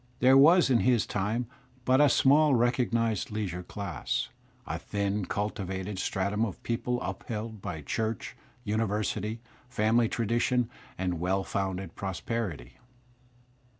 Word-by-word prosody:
There 130 +2 +6
was 155 +2 +7
in 120 - +5
his 120 -2 +3
time 105 +5 -1 0.4
but 130 +2 +4
a 145 - +6
small 145 +2 +5
recognized 115 -3 +1
leisiu*e 95 -5 -3
dass, 100 -6 -3 0.4
a - - -4
thin 100 -1 -2
cultivated 95 -1 -3
stratum 100 +3 0
of 105 -6 -4
people 120 +1 -1
upheld 110 -2 -5
by 80 -5 -5
church, 110 +5 -3 0.3
university, 110 0 -1 0.3
family 115 -1 +2
tradition 120 +1 +1 0.3
and 90 -2 -2
well 95 +3 0
founded 95 -3 -3
prosperity. 95 - -4
110 Hz, 115 wpm, -29 LUFS, 95-120 Hz, 0.4 s, was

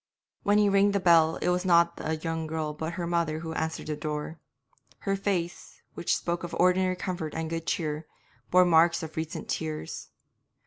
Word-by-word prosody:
When 205 +1 +3
he 210 -1 +4
rang 200 0 +4
the 200 - +2
bell 165 -3 +5
it - - +2
was 180 0 +1
not 170 -2 +4
the 160 +1 -2
young 160 0 -3
girl 155 -1 -3
but 160 +2 -4
her 175 0 -3
mother 170 -2 0
who 160 -1 -5
answered 160 0 -3
the 150 - -3
door; 150 +2 -4 0.6
her 195 -1 0
face, 185 -4 -3
which 170 - 0
spoke 170 0 -3
of 175 - -5
ordinary 185 0 +3
comfort 175 -4 -4
and 160 0 -3
good 165 0 -4
cheer, 155 -1 -2 0.4
bore 180 0 +6
marks 170 0 +4
of 160 -1 -7
recent 160 0 -4
tears. 155 - -4
165 Hz, 185 wpm, -28 LUFS, 160-180 Hz, 0.6 s, bore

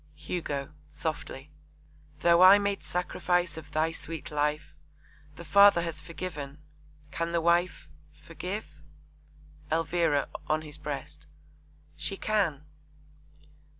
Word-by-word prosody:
HUGO 150 -3 -4 0.2
(softly). 150 -2 -5 0.7
Though 170 +1 +5
I 190 +2 +10
made 200 -1 -1
sacrifice 180 -1 -1
of 155 -2 -9
thy 155 +2 +1
sweet 165 -1 -6
life. 150 +1 -1 0.6
The 170 - -10
Father 200 +1 +6
has 165 -4 -5
forgiven. 150 -5 -6 0.5
Can 170 0 -2
the 170 - +3
wife 170 +2 +1 0.3
Forgive? 180 +6 -6 1.0
ELVIRA 165 -2 +1 0.2
(on 155 +1 +1
his 150 -1 -9
breast). - - -6 0.7
She 195 - -2
can! 180 -11 0
165 Hz, 105 wpm, -29 LUFS, 150-180 Hz, 1.0 s, I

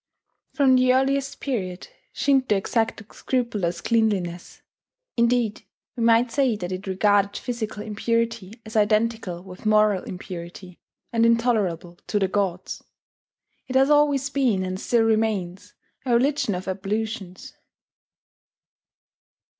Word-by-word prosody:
From 270 -3 +4
the 255 0 +4
earliest 270 +1 0
period 190 -10 -4 0.2
Shinto 265 -6 +2
exacted 225 +1 -2
scrupulous 210 -9 -2
cleanliness 195 -7 -1 0.5
indeed, 235 -2 +1 0.3
we 240 - -5
might 230 +1 +4
say 265 -3 +2
that 180 -3 -5
it 185 +2 -5
regarded 200 +1 +2
physical 220 -4 -4
impurity 230 -1 -2
as 215 - -10
identical 215 -4 +1
with 185 -1 -12
moral 215 -3 +4
impurity, 180 0 -8 0.3
and 230 0 +2
intolerable 215 -8 +1
to 210 - 0
the 195 -2 +2
gods. 190 -2 -2 0.8
It 260 - -5
has 270 +2 +4
always 290 -2 +3
been, 250 -9 +1
and 185 0 -4
still 235 +2 +2
remains, 215 -5 -1 0.3
a 250 -2 +2
religion 255 -5 +1
of 180 +1 -6
ablutions. 200 0 -4
215 Hz, 115 wpm, -24 LUFS, 190-240 Hz, 0.8 s, From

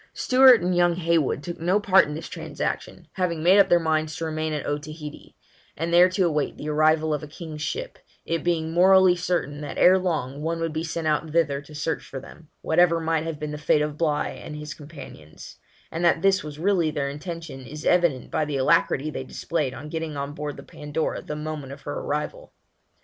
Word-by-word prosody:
Stewart 255 -2 +6
and 180 +1 0
young 175 -1 +3
Heywood 165 -5 +1
took 175 - -6
no 180 +5 +2
part 195 -2 +5
in 150 - -5
this 160 - -6
transaction, - - -5
having 170 -4 -1
made 185 +4 +6
up 200 - +5
their 175 - +5
minds 155 -1 0
to 165 - -4
remain 155 0 -2
at 150 -2 -3
Otaheite, 150 +1 -6 0.4
and 165 +2 -2
there 175 +1 +7
to 185 0 +1
await 150 -4 -1
the 150 - -5
arrival 155 +1 +3
of 150 - -2
a 150 - -8
king's 155 0 -8
ship, - - -4 0.3
it 165 -2 -2
being 160 -2 0
morally 185 +1 +6
certain 170 -4 -2
that 145 - -6
ere 185 +1 +6
long 150 -6 -2
one 165 +2 -2
would 165 -1 -2
be 160 +1 -2
sent 165 0 -4
out 155 +1 0
thither 150 -3 +1
to 150 +1 -14
search 160 +2 -2
for 135 - -7
them, 155 +4 -14
whatever 170 0 +3
might 160 -1 0
have 165 -2 -4
been 150 0 -4
the 150 - -6
fate 150 0 +2
of 150 -1 -3
Bligh 150 -2 -1
and 150 - -7
his 150 0 -6
companions; 140 - -12 0.3
and 165 - -3
that 170 -1 +3
this 195 0 +3
was 150 -1 -8
really 175 -1 +2
their 145 -2 -2
intention 160 0 -7
is 150 +3 -8
evident 170 -8 +2
by - - +1
the 150 -2 -2
alacrity 150 +1 +2
they 135 - -5
displayed 150 +1 -2
in 145 - -8
getting 160 -2 -4
on 140 +1 -4
board 150 0 -5
the 140 - -9
Pandora, 150 +3 -4
the 150 - -6
moment 150 -3 -5
of 140 - -12
her 145 - -4
arrival. 150 - -4
155 Hz, 215 wpm, -25 LUFS, 150-170 Hz, 0.4 s, there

